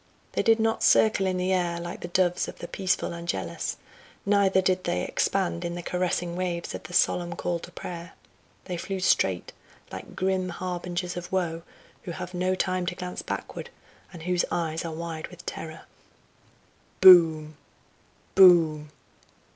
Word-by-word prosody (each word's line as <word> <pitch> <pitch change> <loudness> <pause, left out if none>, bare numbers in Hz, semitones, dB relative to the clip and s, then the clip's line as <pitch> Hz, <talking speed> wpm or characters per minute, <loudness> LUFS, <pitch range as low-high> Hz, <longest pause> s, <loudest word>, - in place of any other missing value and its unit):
They - - 0
did 225 0 +4
not 225 0 +1
circle 215 -3 +4
in 185 -1 0
the 185 +1 0
air 175 -2 0
like 175 +1 -6
the - - -6
doves 180 0 +1
of - - -8
the 175 - -7
peaceful 185 -2 -1
angelus, 95 - -4 0.5
neither 200 -2 +3
did 185 -1 +1
they 90 - 0
expand 85 0 0
in 170 - -3
the 175 - -6
caressing 175 0 -1
waves 175 -1 -3
of - - -6
the 175 - -9
solemn 175 -1 +2
call 175 0 -2
to 175 - -11
prayer; 170 -1 -8 0.5
they 180 - -4
flew 190 +3 -4
straight 95 - +1 0.4
like - - -9
grim 185 -1 0
harbingers 180 0 -4
of 175 - -7
woe, 170 -3 -1 0.4
who 175 - -6
have 180 +2 -7
no 185 +1 0
time 185 -1 -1
to 180 - -2
glance 180 0 -5
backward - - -6 0.4
and 170 -4 -10
whose 180 0 +1
eyes 160 -2 -2
are 165 - -4
wide 160 -1 -5
with 175 -1 -14
terror. 160 -1 -6 1.2
"Boom! 160 -4 +7 0.8
boom! 165 -5 +6
175 Hz, 160 wpm, -26 LUFS, 170-185 Hz, 1.2 s, Boom